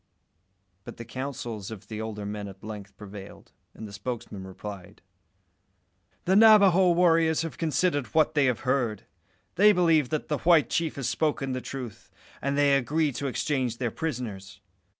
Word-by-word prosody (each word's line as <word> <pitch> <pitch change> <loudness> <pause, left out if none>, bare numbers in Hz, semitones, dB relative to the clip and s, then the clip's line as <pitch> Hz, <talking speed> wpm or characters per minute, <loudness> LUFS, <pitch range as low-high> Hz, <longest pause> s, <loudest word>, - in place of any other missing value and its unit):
But - - -10
the 115 - -8
counsels 120 -4 -6
of 105 -3 -10
the 110 0 -6
older 105 -2 -5
men 105 0 -5
at 95 -1 -12
length 105 -2 -9
prevailed, 100 -1 -11 0.2
and 110 - -8
the 100 - -12
spokesman 105 -3 -6
replied 100 +1 -10 1.2
"The 190 - +3
Navajo 200 -4 +6
warriors 165 -2 +3
have 165 - -7
considered 155 -4 0
what 155 +5 +2
they 145 -3 +3
have 125 -3 0
heard. 125 -5 -1 0.5
They 210 +3 +7
believe 165 -7 +3
that 155 - -3
the 150 - -1
white 165 -3 +4
chief 165 -2 -1
has 135 -3 -3
spoken 150 -3 -1
the 130 0 -3
truth, 125 -6 -8 0.3
and 140 +1 -1
they 145 -1 +4
agree 150 +3 +1
to 140 +2 -4
exchange 130 -3 -1
their 120 -2 -2
prisoners. 110 - -5
130 Hz, 160 wpm, -27 LUFS, 105-160 Hz, 1.2 s, They